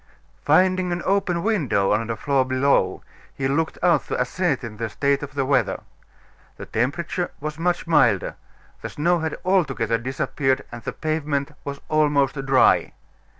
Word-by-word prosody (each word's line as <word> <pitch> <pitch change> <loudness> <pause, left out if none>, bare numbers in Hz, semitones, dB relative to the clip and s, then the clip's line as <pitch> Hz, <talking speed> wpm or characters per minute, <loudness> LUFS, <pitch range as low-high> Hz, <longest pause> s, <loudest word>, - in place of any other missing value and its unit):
Finding 185 -1 +3
an 175 0 -2
open 185 -3 +1
window 145 - +1
on 110 +2 +1
the 115 - -2
floor 140 +2 +1
below, 130 -7 +1 0.3
he 135 - -1
looked 160 +4 -1
out 170 -5 +3
to - - -2
ascertain 135 - -1
the 115 0 -3
state 140 +5 0
of 140 -1 -8
the 135 -2 0
weather. 135 0 +1 0.8
The - - -7
temperature 170 +9 -2
was 155 +1 -5
much 175 +1 0
milder; 125 - +3 0.5
the - - -5
snow 170 +4 +1
had 160 -1 -3
altogether 135 -12 +1
disappeared, 130 +2 -1
and 120 0 -8
the - - -4
pavement 150 -3 -2
was 140 0 -6
almost 145 -2 +1
dry. 135 -1 +4
140 Hz, 150 wpm, -23 LUFS, 130-170 Hz, 0.8 s, dry